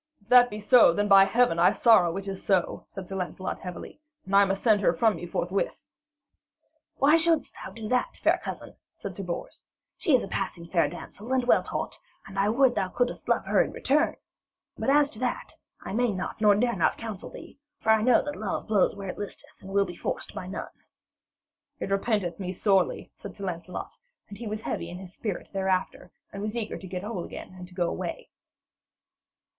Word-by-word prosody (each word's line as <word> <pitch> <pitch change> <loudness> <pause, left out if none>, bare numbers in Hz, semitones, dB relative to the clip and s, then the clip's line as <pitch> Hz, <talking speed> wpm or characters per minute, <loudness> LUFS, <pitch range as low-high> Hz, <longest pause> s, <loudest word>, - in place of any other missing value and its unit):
'If 200 - -30
that 245 0 +7
be 210 - -6
so, 225 -1 +6
then, 205 +3 0
by 195 -1 +8
Heaven, 225 -4 +2
I 175 - +6
sorrow 190 -7 +4
it 195 0 -6
is 195 -1 -5
so,' 190 -3 0
said 190 -2 -8
Sir 195 - -6
Lancelot 185 0 -4
heavily. 180 +9 -8 0.3
'And 195 - -1
I 200 0 +7
must 195 0 -2
send 215 -4 +4
her 180 - +3
from 220 +3 +3
me 175 +1 -7
forthwith.' 180 +3 -2 1.1
'Why 295 +4 +5
shouldst 330 -1 +1
thou - - -8
do 220 -2 -7
that, 255 - 0
fair - - +2
cousin?' - - -7 0.2
said 200 - -7
Sir 200 - -5
Bors. 175 -2 -6 0.4
'She 315 -9 +4
is 250 - +2
a - - -5
passing 185 -4 -3
fair 170 0 +2
damsel 205 +6 -9
and 260 -1 +2
well - - +5
taught, - - -4 0.3
and 195 0 -6
I 200 +1 +3
would 255 +3 +4
that - - 0
thou 185 - -2
couldst 245 0 -1
love - - +2
her - - +3
in - - 0
return. 300 +4 +1 0.6
But - - -2
as 290 +1 +5
to 215 - -6
that, 250 -1 -2 0.3
I - - -6
may 240 +1 +2
not 190 +2 -5
nor 210 -2 +6
dare 235 +3 +1
not 170 - +1
counsel 220 -4 -6
thee. - - -12 0.2
For 220 - +2
I 220 -1 +4
know 245 +2 +4
that 295 0 -4
love 210 -2 -3
blows 210 -3 +2
where 195 -1 -6
it - - -6
listeth 205 - -7
and 190 - -10
will 200 0 +2
be 175 -2 -8
forced - - -4
by 180 - -6
none.' 190 - -4 1.1
'It - - -4
repenteth 195 -4 0
me 185 -1 -3
sorely,' 190 -1 +1
said - - -10
Sir 200 - -5
Lancelot, 180 0 -5 0.3
and 200 - -10
he 235 - -5
was 215 +1 -4
heavy 170 - -4
in 180 +2 -8
spirit 195 +1 -5
thereafter, 190 -1 -1 0.2
and 200 - -6
was 215 +3 -3
eager 220 -2 -3
to 190 - -9
get 180 0 -5
whole 205 -4 -4
again - - -9
and 180 -1 -10
to 180 - -17
go 175 -2 +1
away. - - -5
200 Hz, 215 wpm, -27 LUFS, 185-230 Hz, 1.1 s, by